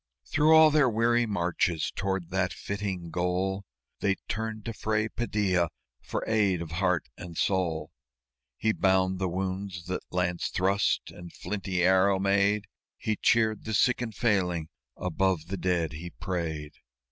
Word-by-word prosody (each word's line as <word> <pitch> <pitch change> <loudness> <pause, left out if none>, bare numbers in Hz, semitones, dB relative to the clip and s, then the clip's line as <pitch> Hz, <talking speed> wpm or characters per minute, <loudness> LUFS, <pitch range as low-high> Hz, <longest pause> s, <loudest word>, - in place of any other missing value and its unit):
Through 155 +2 +4
all 160 -1 +8
their 145 -4 +4
weary 115 +1 +2
marches 85 -4 0
toward 95 -3 -2
that 95 -1 0
flitting 95 -4 -4
goal 95 +3 -1 0.3
They 100 -1 +2
turned 110 -1 -4
to 115 - -3
Fray 110 +1 0
Padilla 100 -8 0 0.3
for - - -3
aid 105 -5 +2
of 85 -2 -6
heart 90 -3 +1
and 85 -2 -9
soul. 85 -5 0 0.7
He 110 - +2
bound 95 -1 +2
the 95 -1 0
wounds 95 -1 -3
that 90 0 -3
lance 90 -1 0
thrust 100 +2 +1
and 85 -1 -10
flinty 95 -2 -2
arrow 95 +1 +4
made; 100 +2 +2 0.3
He 110 - -1
cheered 110 -1 +2
the 110 -1 -2
sick 125 +4 +3
and 115 -4 -4
failing; 90 -9 +1 0.3
above 90 -2 0
the 100 - -3
dead 90 -3 0
he 85 +4 -6
prayed. 80 -5 -4
95 Hz, 145 wpm, -28 LUFS, 90-105 Hz, 0.7 s, all